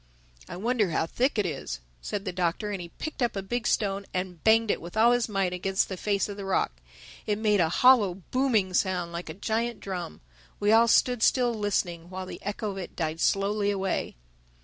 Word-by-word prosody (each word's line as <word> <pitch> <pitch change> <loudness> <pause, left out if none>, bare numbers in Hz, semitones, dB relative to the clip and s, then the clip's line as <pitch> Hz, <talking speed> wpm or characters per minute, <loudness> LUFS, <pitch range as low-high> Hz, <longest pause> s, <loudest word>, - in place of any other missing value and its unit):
"I - - -6
wonder 220 -1 +1
how 160 0 0
thick 250 - 0
it 210 - +2
is," 135 - -4 0.2
said 200 - -4
the 185 - -2
Doctor; 180 +3 -1
and 195 -3 -3
he 170 - -8
picked 310 - -7
up 240 -3 +1
a 195 - -3
big 240 +4 -2
stone 200 -1 0
and 180 -3 -4
banged 225 -1 +4
it - - -2
with 170 +5 -8
all 230 +2 +6
his 245 -1 +1
might 195 -3 0
against 190 +2 0
the 190 - -3
face 200 +1 0
of 205 -1 -7
the 200 - -6
rock. 195 -1 +1 0.6
It 210 -1 +1
made 210 -2 +2
a 165 -2 +3
hollow 215 -2 +5 0.2
booming 230 -8 +2
sound, 180 -2 0
like 170 0 -6
a 155 - -6
giant 230 +4 -2
drum. 180 - -6 0.4
We 205 +1 +2
all 230 +1 +6
stood 245 +1 +3
still 245 0 +3
listening 180 -5 -2
while 185 0 -5
the - - -9
echo 205 +1 -3
of 195 - -8
it 180 - -7
died 160 -1 -2
slowly 200 +1 +1
away. 195 -1 -1
200 Hz, 215 wpm, -27 LUFS, 180-220 Hz, 0.6 s, all